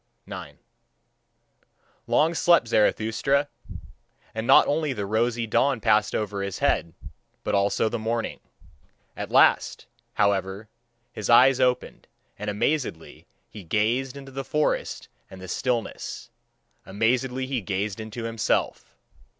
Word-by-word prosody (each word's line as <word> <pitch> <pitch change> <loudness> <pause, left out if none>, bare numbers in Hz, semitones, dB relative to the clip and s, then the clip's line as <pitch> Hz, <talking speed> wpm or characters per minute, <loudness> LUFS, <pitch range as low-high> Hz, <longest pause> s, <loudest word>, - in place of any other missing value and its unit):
9. - - -9 1.5
Long 160 +3 +3
slept 170 -5 +4
Zarathustra; 115 +6 +1 0.8
and 110 +1 -4
not - - +7
only 150 -1 0
the 105 -5 -4
rosy 115 +3 0
dawn 130 +3 +1
passed 110 -1 +2
over 100 -2 -2
his 100 -1 -4
head, 85 -2 0 0.5
but - - -2
also 100 +2 +2
the 115 +1 -3
morning. 115 +1 -2 0.8
At - - -5
last, - - +3 0.3
however, 100 +1 0 0.4
his - - -5
eyes 130 +2 +6
opened, 125 -1 0 0.3
and 105 +1 -3
amazedly 105 - -2 0.2
he 105 - -11
gazed 120 - 0
into 135 -1 -10
the 135 +1 -5
forest 150 +2 -1 0.2
and 95 - -11
the 95 - -9
stillness, 120 +4 -3 0.5
amazedly 125 +6 0
he 130 -2 -2
gazed 100 +1 -3
into 110 +2 -6
himself. 115 - -2
115 Hz, 120 wpm, -25 LUFS, 105-130 Hz, 1.5 s, not